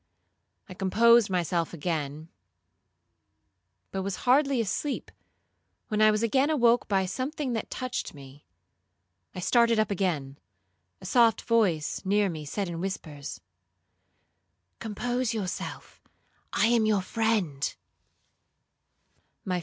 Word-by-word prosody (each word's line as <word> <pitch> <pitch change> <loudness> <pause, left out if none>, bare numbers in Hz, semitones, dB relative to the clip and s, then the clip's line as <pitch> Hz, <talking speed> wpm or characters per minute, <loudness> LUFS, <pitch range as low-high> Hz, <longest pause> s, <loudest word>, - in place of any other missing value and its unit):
I 185 - -9
composed 225 +4 +4
myself 175 -2 -1
again, 155 -1 -3 1.6
but 190 - -2
was 195 0 -3
hardly 275 +1 +4
asleep, 230 +7 -2 0.8
when 215 -1 0
I 215 - +7
was 215 +1 +1
again 265 +5 +2
awoke 240 -6 +3
by 195 -2 +1
something 260 - -3
that 225 - -3
touched 255 - -4
me. 140 0 -13 0.9
I - - -5
started 235 +3 +3
up 215 -1 +1
again; 155 -8 -2 0.6
a - - -11
soft 235 -3 +3
voice 200 -10 +1
near 200 +1 +2
me 155 -3 -6
said 195 +7 -3
in 170 -1 -5
whispers, 150 - -6 1.4
'Compose 240 +2 -2
yourself; 190 -4 -5 0.5
I - - +2
am 230 -1 +3
your 205 -3 +2
friend.' 200 -11 -1
205 Hz, 110 wpm, -27 LUFS, 175-235 Hz, 1.6 s, I